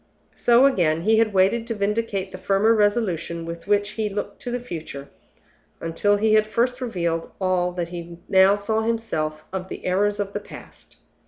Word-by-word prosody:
So 240 +2 +5
again, 170 - +2
he 220 +2 +4
had 225 -1 +2
waited 200 +4 +2
to 230 - -2
vindicate 205 -1 -1
the - - -8
firmer 200 +3 +3
resolution 205 -6 0
with 170 +2 -8
which 205 0 +2
he 215 0 -2
looked 205 0 -5
to 245 - -5
the 245 +1 -2
future, 160 - -8 0.7
until 205 +5 +1
he 215 +1 +2
had 215 0 +4
first 250 +4 0
revealed 170 -8 -2
all 185 -2 +1
that 175 -1 -3
he 170 -1 -8
now 190 +1 +5
saw 220 +2 -1
himself 215 -10 -2
of 190 -1 -4
the - - -8
errors 205 +3 +1
of 200 -1 -3
the 205 - -2
past. 205 - -13
205 Hz, 180 wpm, -23 LUFS, 175-220 Hz, 0.7 s, So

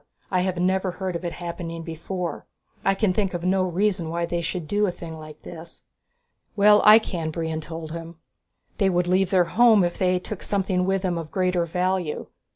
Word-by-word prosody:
I 185 -1 +2
have 185 -1 -1
never 185 +1 +1
heard 185 -1 -4
of 170 - -4
it 175 - -3
happening 170 -1 -6
before. 170 +2 -5 0.4
I 195 - +3
can 195 -2 +1
think 195 -2 0
of 170 - -4
no 185 +1 +2
reason 180 -2 0
why 170 +1 -1
they 170 0 -2
should 170 -1 -4
do 205 +3 +1
a - - 0
thing 170 -2 -8
like 155 -1 -12
this." 165 0 -10 0.7
"Well, 210 0 +6
I 215 +1 +9
can," 175 -7 -2
Brion 160 0 -3
told 160 0 -7
him. 165 0 -7 0.6
"They 195 - +4
would 175 -1 +1
leave 185 +1 +2
their 185 -2 +4
home 220 +3 +5
if 175 0 -2
they 185 -1 +3
took 185 +2 -6
something 190 -2 0
with 195 0 0
them 175 -2 0
of 160 -2 -7
greater 180 -2 0
value. 180 -1 -1
180 Hz, 200 wpm, -24 LUFS, 170-190 Hz, 0.7 s, I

